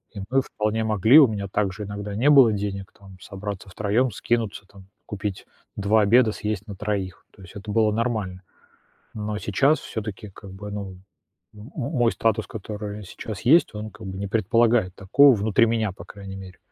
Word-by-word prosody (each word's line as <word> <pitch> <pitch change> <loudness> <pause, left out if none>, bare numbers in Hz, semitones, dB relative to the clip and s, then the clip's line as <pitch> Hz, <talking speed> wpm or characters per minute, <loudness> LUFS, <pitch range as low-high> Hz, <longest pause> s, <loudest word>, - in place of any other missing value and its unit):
И - - -6
мы 135 +2 +3
вполне 110 -3 -2
могли 110 - +5
у 140 - +7
меня 100 -2 -4
также 100 +1 -2
иногда 100 0 -6
не 130 +7 +3
было 135 -6 +7
денег 100 0 -4
там 95 -2 -14
собраться 100 0 -7
втроем, 105 +6 0
скинуться, 110 -2 -2
там, 100 -1 -16 0.2
купить 105 -2 -5 0.3
2 105 +2 +3
обеда, 110 +2 +4
съесть 105 0 -4
на 100 - -7
3. 100 -3 -4
То - - -18
есть 95 +4 -14
это 105 +1 -7
было 110 0 +3
нормально. 110 -6 -2 0.7
Но 105 -1 -4
сейчас 135 +10 +2
всё-таки 105 -1 -6
как 100 +1 -13
бы, 105 +2 -8
ну, 100 -2 -5 0.6
м 105 +5 -12
мой 130 -4 +1
статус, 110 -1 0
который 105 0 -7
сейчас 100 +1 -8
есть, 160 +8 +4
он 105 +1 -6
как 110 -2 -11
бы 95 0 -6
не 100 - -3
предполагает 110 -1 +2
такого, 130 +8 +5
внутри 110 +2 +3
меня, 110 -3 0
по - - -12
крайней 100 -1 -10
мере. 95 -1 -11
105 Hz, 180 wpm, -24 LUFS, 100-115 Hz, 0.7 s, у